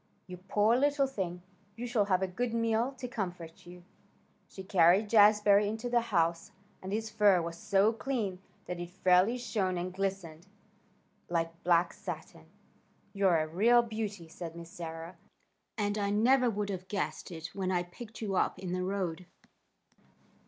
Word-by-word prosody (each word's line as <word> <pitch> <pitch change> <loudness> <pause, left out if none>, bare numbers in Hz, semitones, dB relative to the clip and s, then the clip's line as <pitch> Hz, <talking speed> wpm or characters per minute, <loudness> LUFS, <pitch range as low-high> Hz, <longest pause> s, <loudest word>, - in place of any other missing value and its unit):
You 180 -1 -9
poor 205 +5 +2
little 285 +1 +2
thing! 180 -9 -4 0.3
You 235 +2 -5
shall 230 -4 +1
have 190 -1 +1
a - - 0
good 230 +5 -3
meal 230 +2 +1
to 255 - -5
comfort 180 -8 -6
you." 175 0 -12 0.7
She 190 - -9
carried 190 +2 +4
Jazbury 210 -1 +6
into 220 +3 -3
the 240 -1 +3
house, 170 -7 0 0.3
and 190 - -6
his 220 +1 -2
fur 205 -4 +4
was 170 0 -4
so 200 +4 +3
clean 220 -7 -3 0.2
that 180 -1 -5
it 175 0 -5
fairly 185 +5 +3
shone 200 -7 -1
and 180 +1 -4
glistened 190 -3 -4 0.8
like 165 -1 -1
black 175 0 +3
satin. - - -8 0.7
"You're 195 -4 +3
a 155 0 0
real 230 +9 +4
beauty," 215 -6 -5
said 165 0 -8
Miss 170 0 -10
Sarah, 165 +1 -7 0.6
"and 205 0 -1
I 200 -1 0
never 245 +5 +3
would 205 -2 -2
have 185 -1 -6
guessed 205 0 -3
it 165 -2 -8
when 190 -2 -2
I 175 -1 +1
picked 220 +6 -11
you 200 -2 -2
up - - +1
in 185 -2 -6
the 185 - -1
road." 185 -2 -3
195 Hz, 165 wpm, -31 LUFS, 175-220 Hz, 0.8 s, Jazbury